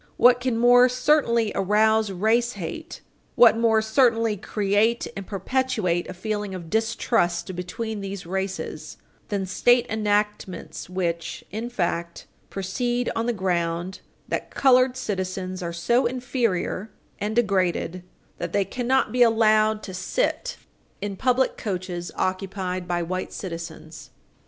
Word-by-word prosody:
What 245 0 +6
can 250 -2 -1
more 245 +1 +6
certainly 250 -4 +2
arouse 215 +2 +3
race 225 +6 +1
hate, - - -7 0.3
what 235 -2 +7
more 225 -1 +3
certainly 225 -1 +3
create 210 +4 +1
and 195 -1 -6
perpetuate 205 -4 -1
a - - -5
feeling 205 0 -3
of 170 -3 -8
distrust 215 -5 0
between 205 +4 -4
these 195 -2 -6
races, 190 +2 -4 0.3
than 200 -3 -2
state 240 +6 +3
enactments 210 -5 -2
which, 170 -2 -3
in 225 +4 -4
fact, 170 -6 -2 0.2
proceed 240 +6 -1
on 230 +1 -1
the - - +2
ground 175 -3 -1 0.3
that - - -3
colored 255 -1 +4
citizens 185 -1 -3
are 170 -1 -3
so 205 +10 +2
inferior 235 -5 -1 0.3
and 210 +1 -2
degraded 185 -5 +1 0.4
that - - -4
they 200 -1 +2
cannot 255 +4 0
be 250 - 0
allowed 215 -2 +4
to 190 - -7
sit - - -1 0.4
in 205 0 -4
public 255 +4 +1
coaches 180 -3 -4
occupied 185 -1 -2
by 175 -1 0
white 185 +2 -3
citizens. 165 -3 -8
210 Hz, 130 wpm, -24 LUFS, 185-235 Hz, 0.4 s, what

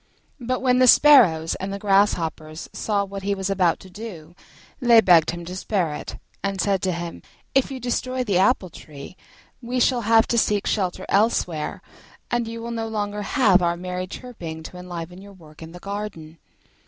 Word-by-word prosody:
But 255 +1 -3
when 250 -1 +3
the 255 - +5
sparrows 220 - +6
and 190 +1 -5
the 200 - -4
grasshoppers 175 -6 0
saw 205 -2 -1
what 195 0 -7
he 200 +1 -1
was 190 0 -3
about 185 -4 +2
to 190 - -13
do, 180 -6 -9 0.5
they 240 -4 +6
begged 175 -6 +5
him 175 0 -5
to 180 +2 -7
spare 185 -5 -1
it, - - -7 0.3
and 195 -1 -2
said 195 -2 +1
to 190 - 0
him, 170 -1 -6 0.3
"If 270 - +2
you 265 -1 -6
destroy 255 +1 -2
the 195 -1 +2
tree 145 +2 -11 0.5
we 250 +1 -3
shall 245 0 +2
have 225 +1 +4
to 235 - +3
seek 210 -2 +1
shelter 185 -2 -1
elsewhere, 190 -7 0 0.5
and 240 -1 0
you 230 0 -7
will 235 - -5
no 225 -1 -3
longer 210 -1 -3
have 205 -5 +3
our 170 0 0
merry 180 +1 -5
chirping 175 -9 -8
to 180 - -10
enliven 180 0 -8
your 200 0 -13
work 155 -4 -17
in 160 0 -9
the 175 - -10
garden." 195 -6 -7
195 Hz, 185 wpm, -23 LUFS, 175-230 Hz, 0.5 s, sparrows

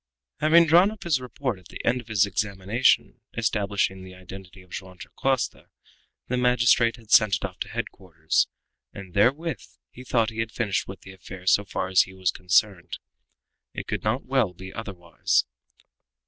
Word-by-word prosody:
After - - -1
having 170 -1 +8
drawn 175 +5 +6
up 215 -1 -10
his 155 -7 +1
report 125 -4 -4
at 90 - -18
the - - -9
end 125 +1 +1
of 120 - -20
his 105 -3 +3
examination 100 +4 0 0.2
establishing 100 -4 0
the 95 0 -11
identity 95 0 -12
of 90 - -24
Joam 95 -1 -8
Dacosta, 135 +4 -2 0.6
the 125 - -1
magistrate 120 -2 +3
had 115 -3 -17
sent 105 -3 +6
it 95 - -4
off 90 -2 -8
to - - -4
headquarters, 90 -8 -1 0.5
and 95 -3 -10
therewith 140 +9 +1 0.3
he 125 - -11
thought 115 -3 +1
he 110 - -8
had 110 0 -2
finished 110 -5 -1
with 95 0 -9
the 95 - -12
affair 95 0 -11
so 100 +2 +4
far 95 - -3
as 95 -1 +5
he 95 - -5
was 95 -3 0
concerned. 95 0 0 0.8
It - - -5
could - - -4
not 110 +5 -1
well 130 -8 +1
be 95 +2 -10
otherwise. 90 -8 -1
105 Hz, 175 wpm, -25 LUFS, 95-125 Hz, 0.8 s, having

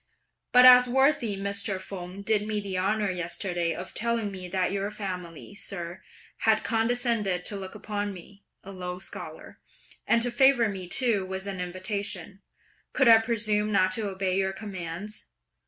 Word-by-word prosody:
but 250 0 +8
as 250 0 +9
worthy 265 -5 +2
Mr. 200 0 -1
Feng 185 0 -7
did 210 0 +1
me 215 -1 0
the 200 -2 -4
honour 200 +2 +1
yesterday 175 -1 -2
of 185 - -7
telling 230 -2 -1
me 185 -2 -6
that 185 0 0
your 200 0 -2
family, 180 -4 -7
sir, 185 -2 -5 0.4
had 220 -1 +2
condescended 225 -5 0
to 205 - 0
look 190 -1 -7
upon 205 -1 -3
me, 195 +2 -12 0.2
a 195 - -9
low 180 -1 -5
scholar, 185 - -8 0.5
and 230 - +4
to 245 - 0
favour 245 -1 +4
me 190 -3 -5
too 220 0 +1
with 190 +1 -5
an 195 -2 -4
invitation, 190 +1 -4 0.5
could 265 - +3
I 225 -1 +9
presume 215 -2 0
not 185 -2 +3
to 205 +1 0
obey 190 -1 -1
your 190 0 0
commands? 195 0 -6
200 Hz, 160 wpm, -27 LUFS, 185-220 Hz, 0.5 s, as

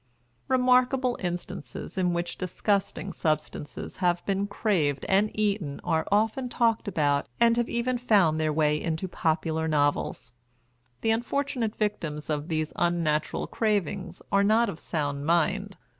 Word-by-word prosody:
Remarkable 255 0 +3
instances 175 -8 -5
in 180 -2 +1
which 170 0 -2
disgusting 195 +1 -1
substances 155 -2 -3
have 175 -2 +1
been 200 0 0
craved 170 - 0
and 200 +2 +3
eaten 200 -9 0
are 160 -2 0
often 220 +5 +1
talked 230 -3 +1
about 145 - +1
and 230 0 +5
have 240 0 0
even 245 +1 0
found 190 -10 +3
their 155 -1 +1
way 150 0 +2
into 165 +2 -2
popular 160 -2 0
novels. 145 -5 0 0.7
The 225 - +2
unfortunate 240 0 -1
victims 165 -8 -2
of 150 0 -2
these 155 -2 -2
unnatural 165 -3 0
cravings 200 -4 -1
are 200 0 +4
not 225 +3 +3
of 160 - -6
sound 145 -3 -2
mind. 190 +4 +1
185 Hz, 135 wpm, -27 LUFS, 155-220 Hz, 0.7 s, and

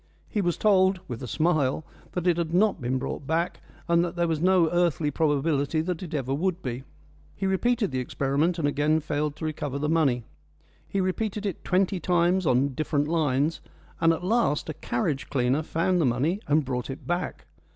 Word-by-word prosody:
He 210 - -1
was 175 -3 0
told, 190 -2 +4
with 120 -2 -6
a 125 - -5
smile, 155 0 +1 0.3
that 180 -1 -2
it 175 -2 +3
had 170 0 -1
not 200 -4 +3
been 130 +2 0
brought 135 +1 -5
back, 165 +3 0 0.3
and 170 0 +4
that 175 0 -3
there 170 -1 +1
was 160 -2 -1
no 180 -2 +4
earthly 170 -4 +1
probability 145 0 +1
that 170 0 -3
it 170 -4 -5
ever 135 -2 -1
would 180 +4 -1
be. 125 0 -4 0.5
He 195 - -3
repeated 210 - +1
the 130 - -1
experiment, 140 +7 0
and 155 -4 +1
again 150 +2 +2
failed 150 -1 -2
to 160 - -6
recover 145 -3 -3
the 150 +1 -1
money. 140 -7 +2 0.6
He 195 - -2
repeated 205 +3 -1
it 195 -5 -3
twenty 185 0 +1
times 175 +1 +2
on 130 +2 +3
different 145 +1 -1
lines, 155 -1 +1 0.4
and 165 0 +4
at 165 +2 -2
last 195 -7 +1
a - - -2
carriage 135 +1 -2
cleaner 130 +2 +1
found 170 +3 0
the - - +3
money 140 +11 +1
and 150 0 +3
brought 125 -1 -3
it 135 - -7
back. 175 +1 -3
160 Hz, 195 wpm, -26 LUFS, 140-180 Hz, 0.6 s, told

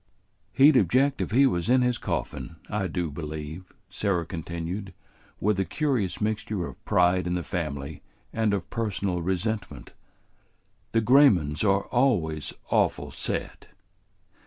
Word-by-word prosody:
"He'd 140 +2 +6
object 130 +8 +2
if - - -2
he 130 +5 +5
was 90 -6 0
in 125 0 +5
his 125 -2 0
coffin, 80 - -4 0.2
I 100 -2 -1
do 85 -2 -3
believe," 80 +3 -7 0.2
Sarah 95 -5 -1
continued, 85 +3 -5 0.4
with 105 -1 +1
a - - +3
curious 120 - -1
mixture 105 -3 -2
of - - -10
pride 90 0 +3
in 90 - 0
the 90 - -2
family 75 -4 -4 0.3
and 110 -2 +1
of 100 -3 -2
personal 100 -6 -1
resentment. 95 +5 -3 1.0
"The 115 - +2
Graymans 105 - +4
are 100 -1 +2
always 90 - +1 0.2
awful - - +1
set." - - -4
95 Hz, 135 wpm, -26 LUFS, 85-110 Hz, 1.0 s, He'd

